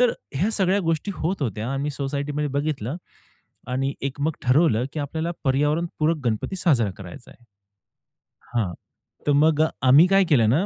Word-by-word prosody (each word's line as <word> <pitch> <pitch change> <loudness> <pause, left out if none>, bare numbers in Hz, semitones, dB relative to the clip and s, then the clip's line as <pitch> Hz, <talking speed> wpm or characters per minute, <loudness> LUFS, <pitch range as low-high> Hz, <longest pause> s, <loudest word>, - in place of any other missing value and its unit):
तर 250 -1 +4 0.2
ह्या 185 +11 +1
सगळ्या 190 0 +2
गोष्टी 165 +3 -1
होत 165 -1 -2
होत्या, 110 +1 -3
आम्ही 140 +2 -2
सोसायटीमध्ये 145 +1 -3
बघितलं. 145 -2 -3 0.7
आणि 135 +2 -1
एक 140 +1 -4
मग 155 +2 +1
ठरवलं, 125 -3 +3
की 155 - -3
आपल्याला 160 +4 -3
पर्यावरणपूरक 150 +4 +1
गणपती 115 - -1
साजरा 125 - +2
करायचाय. 100 +7 -11 1.2
हां. 105 -7 0 0.5
तर - - +4
मग 155 +1 +4 0.2
आम्ही 135 +6 +7
काय 195 0 +4
केलं 115 -7 +4
ना, 160 - +2
145 Hz, 145 wpm, -23 LUFS, 130-165 Hz, 1.2 s, आम्ही